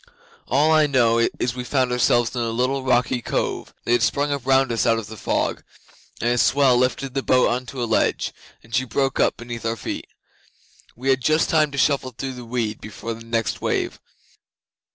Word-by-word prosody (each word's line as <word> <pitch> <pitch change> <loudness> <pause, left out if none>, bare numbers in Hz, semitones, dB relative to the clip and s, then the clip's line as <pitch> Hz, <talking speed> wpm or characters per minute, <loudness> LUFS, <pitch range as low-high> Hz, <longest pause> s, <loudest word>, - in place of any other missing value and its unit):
All 145 +5 +3
I 155 -1 +5
know 120 -4 +3 0.2
is 120 - -1
we 125 0 -5
found 130 0 0
ourselves 120 0 +2
in 120 - -1
a 115 - -1
little 130 +4 0
rocky 125 -1 +1
cove - - -2
that - - -1
had 120 0 +3
sprung 145 +6 +1
up 140 -3 -3
round 135 -1 +3
us 115 - 0
out 115 -1 +3
of 115 - -4
the 110 +2 -9
fog, - - -1 0.6
and 120 - +1
a 120 - +1
swell 135 -1 +4
lifted 125 +1 0
the 135 - -1
boat 130 -1 +3
on 125 +1 -2
to 125 +1 -4
a - - +1
ledge, 110 - 0 0.3
and 115 - -17
she 130 - +2
broke 135 +1 -1
up - - +2
beneath 120 -1 -7
our 115 0 -2
feet. - - -5 0.9
We 130 +3 -3
had 130 -1 +3
just 155 +4 +2
time 155 -2 +3
to 140 - -8
shuffle 135 -3 +1
through 135 -1 -4
the 125 -1 -9
weed 115 -2 -3
before 110 +2 -6
the 115 +1 -11
next 115 -1 -2
wave. - - -1
125 Hz, 210 wpm, -22 LUFS, 115-135 Hz, 0.9 s, I